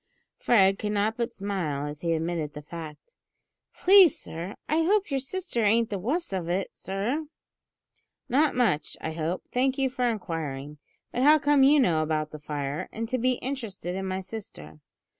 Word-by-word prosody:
Fred 195 -4 +4
could 210 -1 -2
not 210 +2 +1
but 235 -1 -2
smile 180 -8 -3
as 150 +1 -6
he 170 -1 +1
admitted 160 -2 -2
the 150 - -7
fact. 160 - -9 0.6
"Please, 380 -2 +6
sir, 170 +5 -7
I 315 +2 +2
hope 390 +1 +2
yer 275 - +1
sister 275 - -2
ain't 225 +2 +3
the 200 - -2
wuss 280 - -2
of 175 -3 -3
it, 185 +2 -1
sir." 230 +11 -3 1.0
"Not 290 +4 +2
much, 230 -12 +1
I - - -4
hope; 160 +3 -3
thank 260 +1 0
you 270 -2 +1
for 250 -2 0
inquiring; 150 -8 -4 0.3
but 245 - -2
how 300 +3 +7
come 290 -1 +3
you 285 +3 +6
to 275 - +5
know 165 -8 +2
about 155 -1 -1
the 155 - -8
fire, 145 -1 -4
and 225 +1 -4
to 255 0 0
be 255 +2 +2
interested 225 -9 -4
in 190 +1 -3
my 190 0 -2
sister?" 130 - -9
200 Hz, 180 wpm, -27 LUFS, 160-260 Hz, 1.0 s, how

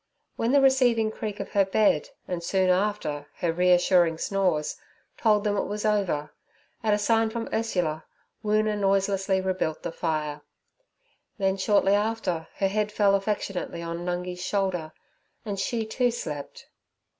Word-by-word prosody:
When 230 +2 0
the 280 0 +5
receiving 245 -5 +3
creak 210 -1 -5
of 200 - -5
her 200 - +4
bed, 190 -5 +2 0.2
and 175 -2 -3
soon 185 +1 +2
after 180 -7 -1
her 170 -2 -1
reassuring 180 -1 +4
snores, 180 -5 0 0.4
told 210 -3 +2
them 205 -1 +1
it - - 0
was 210 +1 -4
over, 190 -9 0 0.5
at 215 -3 +2
a - - 0
sign 225 +2 +2
from 230 0 -4
Ursula, 180 -8 -1 0.4
Woona 215 0 +2
noiselessly 195 -1 +1
rebuilt 185 -4 -2
the - - -3
fire; 155 -3 -2 1.0
then 195 -2 +1
shortly 195 0 +3
after 205 -6 -1
her 195 - +1
head 210 +1 -1
fell 205 -2 +3
affectionately 195 -4 -2
on 170 0 -4
Nungi's 180 0 -3
shoulder, 185 -6 -1 0.5
and 200 -2 -3
she, 230 +1 -1
too, 245 +3 +1
slept. 150 -11 -6
195 Hz, 145 wpm, -26 LUFS, 175-215 Hz, 1.0 s, the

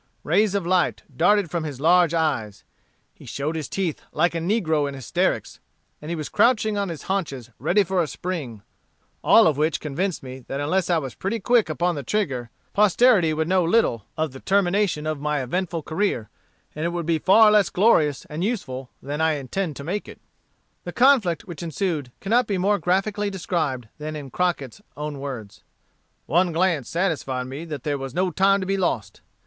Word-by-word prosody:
Rays 200 +5 +2
of 195 -4 -1
light 180 0 +1
darted 205 +4 +3
from 170 -2 -1
his 145 -4 -6
large 170 +2 +4
eyes, 140 -11 -1 0.5
he - - -17
showed 150 +3 -3
his 155 -3 -4
teeth 185 -6 -2
like 170 +3 +1
a 165 - -1
negro 165 -5 +1
in 140 - -7
hysterics, 130 -6 -1 0.4
and 150 - -8
he 170 - -1
was 155 -2 -4
crouching 220 -3 +2
on 200 -2 -1
his 165 -3 -6
haunches 140 - -3
ready 175 - +3
for 190 -1 0
a 165 - -1
spring; 145 - -5 0.6
all - - +7
of 150 -3 +2
which 155 +1 +1
convinced 160 +4 -3
me 130 0 -8
that 135 - -4
unless 175 +6 0
I 175 - +3
was 135 -6 -4
pretty 195 - -3
quick 235 -2 +3
upon 175 +3 0
the 145 - -4
trigger, 135 - -2 0.2
posterity 210 -3 +4
would 160 +1 -1
know 185 0 +3
little 165 - +1
of 155 -2 -1
the 135 - -10
termination 195 -4 +1
of 155 -2 -2
my 150 -2 -1
eventful 170 +4 -2
career, 160 - -1 0.4
and 155 - -5
it 170 - +1
would 170 -1 -3
be 165 -1 +1
far 210 +6 +6
less 210 -3 +4
glorious 160 - +3
and 155 +3 -5
useful 135 - -3
than 145 +3 -3
I 160 0 +3
intend 150 +4 -3
to 140 - -7
make 190 +7 -3
it." - - -11 0.6
The - - -6
conflict 240 -10 +4
which 170 -5 -8
ensued 165 -6 -2
cannot 235 +5 +2
be 200 - 0
more 200 +3 +2
graphically 200 +3 0
described 160 - -2
than 155 +1 -5
in 140 -3 -7
Crocket's 175 - -2 0.2
own 150 -1 -5
words: 125 -7 -7 0.6
"One 175 +3 +2
glance 165 -6 +1
satisfied 155 -8 -1
me 135 +6 -7
that 150 -6 -6
there 145 -1 -1
was 135 -1 -6
no 185 0 +1
time 195 +3 +3
to - - -3
be 195 +1 0
lost. 150 - -2
165 Hz, 190 wpm, -23 LUFS, 145-190 Hz, 0.6 s, all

